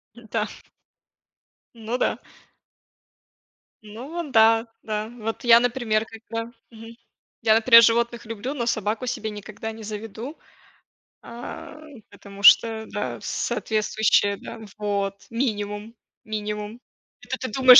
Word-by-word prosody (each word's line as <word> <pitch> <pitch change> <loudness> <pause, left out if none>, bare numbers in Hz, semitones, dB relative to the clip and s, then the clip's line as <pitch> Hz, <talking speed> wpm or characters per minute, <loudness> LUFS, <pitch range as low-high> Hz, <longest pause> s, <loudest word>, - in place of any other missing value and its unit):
М, 240 -1 -14
да. 215 -2 0 1.3
Ну 230 +2 -3
да. - - 0 1.6
Ну 275 +10 -6
да 225 0 +5 0.2
да. 215 0 -3
Вот 225 -1 -4
я, 235 -1 +8
например, 235 -3 +1
когда 230 +1 -6 0.2
мгм, 225 0 -12 0.5
я, 220 -1 +5
например, 230 +1 +8
животных 235 +1 +2
люблю, 230 +4 -4
но 245 -5 -2
собаку 220 +2 -1
себе 230 -3 -2
никогда 210 +2 -7
не 220 0 -10
заведу. 220 +6 -6 0.8
А, 305 +7 -9 0.3
потому 200 0 -12
что, 220 +2 +7
да, 205 - -4
соответствующее, 215 -2 +1
да - - -9 0.2
вот, 200 -1 -2
минимум 215 -2 -3 0.3
минимум. 210 +1 -4 0.4
Это - - -4
ты 255 - -4
думаешь, 255 +1 +9
225 Hz, 115 wpm, -24 LUFS, 210-235 Hz, 1.6 s, думаешь